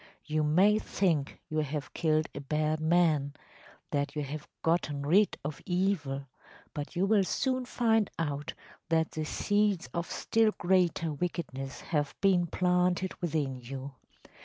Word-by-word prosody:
You 155 0 0
may 185 +8 +4
think 165 -10 0
you 155 -1 -1
have 150 -1 -3
killed 155 -1 +1
a 140 - -6
bad 155 +2 0
man‚ÄĒthat 155 -3 -1
you 150 - -1
have 145 +2 -6 0.2
gotten 150 -4 0
rid 195 +7 +4
of 150 0 -4
evil‚ÄĒbut 145 -6 -3
you 180 +3 +2
will 205 -1 +4
soon 255 +6 0
find 225 -4 +2
out 145 -3 -3 0.3
that 160 -1 +2
the 155 0 -3
seeds 205 -4 +1
of 170 0 -2
still 225 -1 +2
greater 175 -3 +2
wickedness 140 -4 -4
have 145 -3 -1
been 185 -3 +3
planted 180 +1 +1
within 145 -6 -1
you. 135 +2 -7
160 Hz, 135 wpm, -30 LUFS, 145-185 Hz, 0.3 s, may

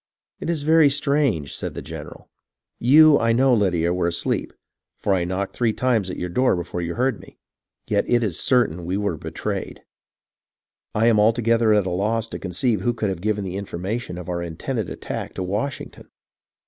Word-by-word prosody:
" - - -62
It - - -3
is 160 -4 -1
very 160 -1 +5
strange," 140 - 0
said - - -5
the - - -5
general. - - -9 0.3
" - - -58
You, 155 0 +8
I 115 0 +2
know, 130 +2 +4
Lydia, 90 -6 +2
were 90 -1 0
asleep, 85 0 -1 0.5
for 100 - 0
I 90 -2 +1
knocked 95 +2 -3
three 115 -3 +1
times 115 -7 +1
at - - -5
your 90 - -3
door 125 +8 +2
before 85 0 -4
you 85 0 -3
heard 125 -2 0
me; - - -15 0.5
yet - - +1
it 120 -1 +3
is 95 -6 -1
certain 120 - +2
we 95 +2 -1
were 100 -4 -1
betrayed. - - -5 1.1
I 110 +1 +3
am 115 -2 +4
altogether 115 +1 +3
at 105 -2 +2
a 95 - -2
loss 110 +5 0
to - - -6
conceive 100 +3 -1
who 120 +4 0
could 110 -3 -1
have 95 -3 -4
given 105 0 -1
the 95 0 -4
information 100 +1 -4
of 90 - -8
our 85 -1 -2
intended 85 +6 -4
attack - - -6
to 95 - -3
Washington. 105 +9 -4
105 Hz, 195 wpm, -23 LUFS, 90-120 Hz, 1.1 s, You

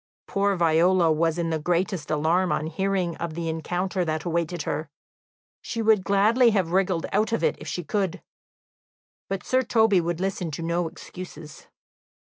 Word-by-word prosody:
Poor 200 0 +1
Viola 170 +1 +3
was 165 +1 +1
in 165 -1 -1
the 160 - 0
greatest 175 +1 -1
alarm 165 +4 +1
on 155 - 0
hearing 180 +1 -1
of 170 -2 -4
the 170 -1 -3
encounter 175 +3 -2
that 155 -2 -2
awaited 170 -1 -2
her; 150 +1 -3 0.7
she 230 - -5
would 220 -3 +3
gladly 215 +6 +4
have 190 -6 0
wriggled 185 -2 +1
out 215 +3 +1
of 230 - 0
it - - +2
if - - -9
she 175 - -3
could, 190 +2 -1 1.1
but 195 -1 -3
Sir 255 0 +2
Toby 220 -6 +3
would 170 0 -2
listen 190 -2 -2
to 155 +2 -5
no 170 +1 0
excuses. 160 -3 -10
175 Hz, 165 wpm, -25 LUFS, 165-195 Hz, 1.1 s, gladly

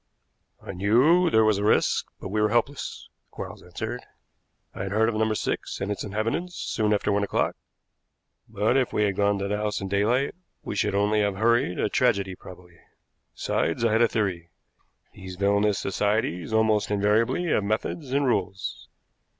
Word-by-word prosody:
"I - - -8
knew 130 - +4
there 110 -6 +4
was 105 -2 +2
a - - -2
risk, 105 - +2
but - - -7
we 105 +2 0
were 105 - +3
helpless," 125 +5 -2 0.2
Quarles - - -8
answered. - - -6 0.7
"I 95 - -6
had 95 0 -4
heard 110 +1 +3
of - - -2
No. 110 0 +1
6 110 - -3
and 100 - -2
its 105 - -3
inhabitants 115 - -2
soon 105 -1 -1
after 105 0 +1
one 100 0 +1
o'clock, 100 - 0 0.9
but 110 +4 +1
if 130 -2 +1
we 105 - +1
had 100 -2 0
gone 100 0 +2
to 100 0 -2
the 105 +1 -1
house 105 0 -2
in 95 - -5
daylight 110 +8 +1 0.3
we - - -5
should - - 0
only 105 +1 +2
have 100 -1 0
hurried 115 -2 +2
a - - +1
tragedy 100 -5 +1
probably. 90 -2 -14 0.6
Besides, 85 +8 -1
I 115 - +3
had 110 +2 +3
a 120 - +6
theory. 95 -7 -2 0.6
These 95 -1 -9
villainous 100 +1 +2
societies 100 -2 -1
almost 110 -1 +2
invariably 105 - +1
have 105 - +2
methods 115 +7 -3
and 140 +1 +2
rules. 100 -6 -2
105 Hz, 175 wpm, -25 LUFS, 100-115 Hz, 0.9 s, a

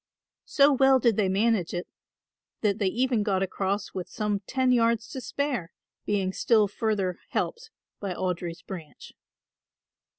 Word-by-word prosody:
So 285 0 +5
well 270 0 +5
did 235 -3 +3
they 195 -3 +2
manage 195 -3 +1
it 175 - -4 0.7
that 205 -3 +1
they 200 - +2
even 240 +3 +1
got 195 -2 +1
across 195 +1 -2
with 185 -2 -5
some 210 -1 -1
ten 260 -1 +2
yards 230 -1 +2
to 260 - -6
spare, 255 - -2 0.4
being 195 -2 0
still 215 -1 +3
further 200 -3 -1
helped 465 -1 -2 0.3
by 195 -3 -4
Audry's 175 -2 -3
branch. 170 -6 -9
210 Hz, 140 wpm, -27 LUFS, 190-245 Hz, 0.7 s, So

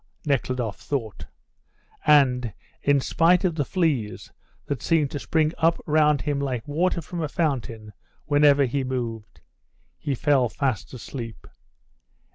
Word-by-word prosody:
Nekhludoff 125 -6 -1
thought, 115 -7 -4 0.8
and 125 -6 +4 0.3
in 145 0 +3
spite 170 +7 +3
of 175 - +2
the 155 -2 0
fleas, 145 - -1 0.3
that 140 - -3
seemed 155 -4 +1
to 145 - -4
spring 155 +2 +1
up 165 +1 +3
round 150 -1 +3
him 145 -2 -1
like 130 -5 -3
water 170 +3 0
from 170 +2 -5
a 155 - -1
fountain 120 -10 -2 0.3
whenever 145 -1 +4
he 135 +2 -1
moved, 120 -4 -5 0.6
he 140 - -2
fell 130 -2 +2
fast 120 -5 -2
asleep. 115 -2 -8
140 Hz, 130 wpm, -24 LUFS, 125-155 Hz, 0.8 s, and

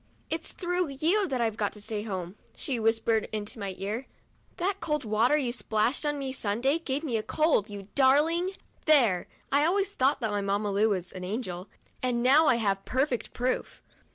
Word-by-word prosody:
" - - -36
It's 325 - -2
through 355 -1 -1
you 335 +9 +1
that 260 -5 -1
I've 225 -2 0
got 205 -2 -1
to 210 - -12
stay 210 0 -4
home," 190 -3 -5 0.2
she 255 -4 -2
whispered 225 0 +1
into 215 +1 -4
my 195 -2 -4
ear; 215 +7 -4 0.5
"that 385 +2 -1
cold 300 -7 -2
water 225 +7 +3
you 260 -5 0
splashed 235 +6 0
on 295 0 0
me 270 -2 -3
Sunday 255 +7 0
gave 290 -2 -2
me 250 -8 0
a - - -1
cold, 300 -5 +1
you 200 -2 -8
darling! 300 +7 +4 0.2
' - - -35
There 235 - +4
— - - -35
I 285 +1 +4
always 390 +4 +2
thought 270 -1 +2
that 220 -2 0
my 205 -1 0
Mamma 200 +1 0
Lu 210 +3 +3
was 185 -3 -2
an 185 - -7
angel, 185 -2 -4 0.3
and 245 -2 0
now 295 +5 +6
I 255 - +5
have 200 -4 0
perfect 260 -1 -1
proof. 250 +1 -2
240 Hz, 205 wpm, -28 LUFS, 210-295 Hz, 0.5 s, now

